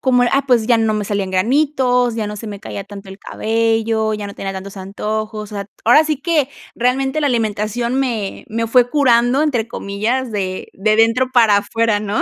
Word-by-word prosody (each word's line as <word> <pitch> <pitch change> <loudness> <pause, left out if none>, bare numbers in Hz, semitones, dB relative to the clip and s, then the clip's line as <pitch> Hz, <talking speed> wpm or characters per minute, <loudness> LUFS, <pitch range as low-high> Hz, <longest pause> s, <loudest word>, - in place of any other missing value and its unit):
como, 250 -2 +3
ah, 270 +3 +1
pues 240 -4 +3
ya 235 -2 +4
no 220 -1 +1
me 210 -1 -2
salían 200 -2 -2
granitos, 250 +3 +2
ya 220 -2 -2
no 210 - -6
se 220 - -8
me 205 -2 -7
caía 200 - -6
tanto 200 0 -11
el 190 0 -10
cabello, 225 0 0
ya 210 -1 -5
no 200 - -9
tenía 195 0 -5
tantos 195 +1 -8
antojos. 215 +2 -4
O - - -7
sea, 200 -1 -4 0.2
ahora 270 +7 +6
sí 305 -3 -1
que, 310 -5 +1 0.3
realmente, 265 +4 0
la 295 - +1
alimentación 230 0 -1
me, 230 -7 -3
me 230 +1 -2
fue 245 +1 +4
"curando", 250 -1 +3
entre 250 -8 0
comillas, 230 +6 -2
de, 185 -3 -3
de 215 +2 +1
dentro 230 +3 +3
para 225 -5 +5
afuera, 220 +1 0
¿no? 210 0 -2
225 Hz, 200 wpm, -18 LUFS, 205-250 Hz, 0.3 s, ahora